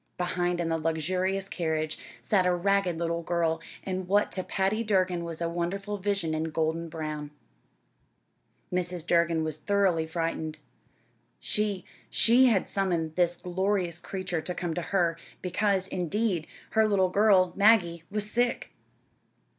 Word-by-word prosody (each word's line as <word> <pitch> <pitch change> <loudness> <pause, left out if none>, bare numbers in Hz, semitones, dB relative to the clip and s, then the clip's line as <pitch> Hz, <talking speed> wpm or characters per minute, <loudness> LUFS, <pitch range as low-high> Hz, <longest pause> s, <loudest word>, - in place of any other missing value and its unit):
Behind, 180 0 0
in 170 -1 -1
the 165 0 0
luxurious 185 +5 -1
carriage, 155 -4 -2 0.2
sat 190 -3 +2
a 180 - +3
ragged 195 -1 +1
little 170 0 -1
girl, 165 -1 0 0.2
and 185 -1 -3
what 205 +2 +2
to 185 - -2
Patty 195 +5 0
Durgin 185 -5 +1
was 170 -1 -6
a 170 - +1
wonderful 195 +5 -3
vision 195 -5 -1
in 155 0 -1
golden 160 +1 -1
brown. 155 -2 -5 1.4
Mrs. 180 -2 -2
Durgin 170 -2 +2
was 155 -1 -3
thoroughly 185 -2 +1
frightened. 160 -1 -3 0.8
She, 205 -4 -1 0.2
she 245 +3 +5
had 215 -6 +2
summoned 170 -5 -1
this 175 -1 +2
glorious 180 -1 -1
creature 185 -2 -3
to 180 +2 -4
come 175 -2 -2
to 175 - -2
her, 170 -2 0 0.2
because, 190 +1 0
indeed, 185 -1 -1 0.2
her 220 -1 +4
little 190 -3 +3
girl, 190 -2 +4
Maggie, 195 -6 +4
was 210 +1 -1
sick! 240 +3 0
180 Hz, 140 wpm, -28 LUFS, 165-195 Hz, 1.4 s, she